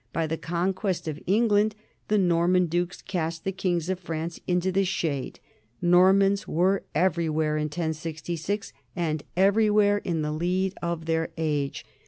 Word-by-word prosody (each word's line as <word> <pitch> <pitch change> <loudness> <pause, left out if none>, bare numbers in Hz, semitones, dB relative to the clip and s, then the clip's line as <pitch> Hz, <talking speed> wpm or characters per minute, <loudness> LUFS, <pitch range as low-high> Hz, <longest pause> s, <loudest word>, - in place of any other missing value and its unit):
By 165 - 0
the 160 +1 -2
conquest 180 +1 -2
of 155 -1 -4
England 210 +1 +3 0.3
the 210 - +2
"Norman 180 -1 +3
dukes 175 +2 -2
cast 165 -3 -3
the 195 - -1
kings 175 -3 -1
of 185 -1 -1
France 165 -1 -4
into 180 +1 +1
the 195 +1 +2
shade.... 160 -7 -2 0.4
Normans 190 +3 +4
were 185 +4 +2
everywhere 160 -4 +1
in 150 0 0
1066, 165 +4 -3 0.2
and 155 -3 -1 0.2
everywhere 205 +1 +4
in 165 -6 -2
the 150 - -1
lead 180 +4 0
of 170 -2 -3
their 165 0 0
age." 150 -3 -2
175 Hz, 145 wpm, -26 LUFS, 160-190 Hz, 0.4 s, Normans